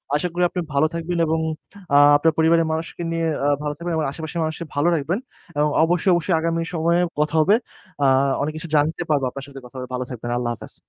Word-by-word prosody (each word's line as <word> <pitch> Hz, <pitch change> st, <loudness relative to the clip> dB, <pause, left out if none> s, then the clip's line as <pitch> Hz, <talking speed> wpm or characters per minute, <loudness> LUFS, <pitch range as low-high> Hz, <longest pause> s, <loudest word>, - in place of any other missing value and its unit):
আশা 180 Hz, -, 0 dB
করি 180 Hz, +1 st, 0 dB
আপনি 180 Hz, +1 st, -4 dB
ভালো 140 Hz, +3 st, +3 dB
থাকবেন 170 Hz, +1 st, -3 dB
এবং 160 Hz, 0 st, 0 dB, 0.6 s
আ -, -, +8 dB, 0.2 s
আপনার 160 Hz, +2 st, +2 dB
পরিবারের 165 Hz, +1 st, +4 dB
মানুষকে 160 Hz, +2 st, -4 dB
নিয়ে 165 Hz, 0 st, 0 dB, 0.2 s
আ -, -, +3 dB, 0.2 s
ভালো 150 Hz, 0 st, -2 dB
থাকবেন 170 Hz, +1 st, -4 dB
এবং 155 Hz, -, 0 dB
আশেপাশের 160 Hz, +3 st, -5 dB
মানুষকে 160 Hz, +1 st, -3 dB
ভালো 145 Hz, +4 st, +2 dB
রাখবেন। 165 Hz, +6 st, -1 dB, 0.4 s
এবং 150 Hz, +1 st, +3 dB
অবশ্যই, 175 Hz, +3 st, +2 dB
অবশ্যই 175 Hz, +1 st, +1 dB
আগামী 165 Hz, +1 st, 0 dB
সময়ে 170 Hz, +1 st, +2 dB, 0.2 s
কথা 150 Hz, +1 st, 0 dB
হবে। 195 Hz, +7 st, +5 dB, 0.5 s
আ -, -, +4 dB, 0.4 s
অনেক 145 Hz, +2 st, -1 dB
কিছু 165 Hz, +1 st, -7 dB
জানতে 155 Hz, +4 st, +1 dB
পারবো 145 Hz, -3 st, +2 dB
আপনার 135 Hz, +2 st, -8 dB
সাথে 140 Hz, -1 st, -10 dB
কথা 125 Hz, -, -15 dB
হবে। 125 Hz, 0 st, -5 dB
ভালো 125 Hz, 0 st, -1 dB
থাকবেন। 120 Hz, -1 st, -6 dB
আল্লাহ 120 Hz, -1 st, -1 dB
হাফেজ। -, -, -11 dB
160 Hz, 215 wpm, -22 LUFS, 145-170 Hz, 0.6 s, আ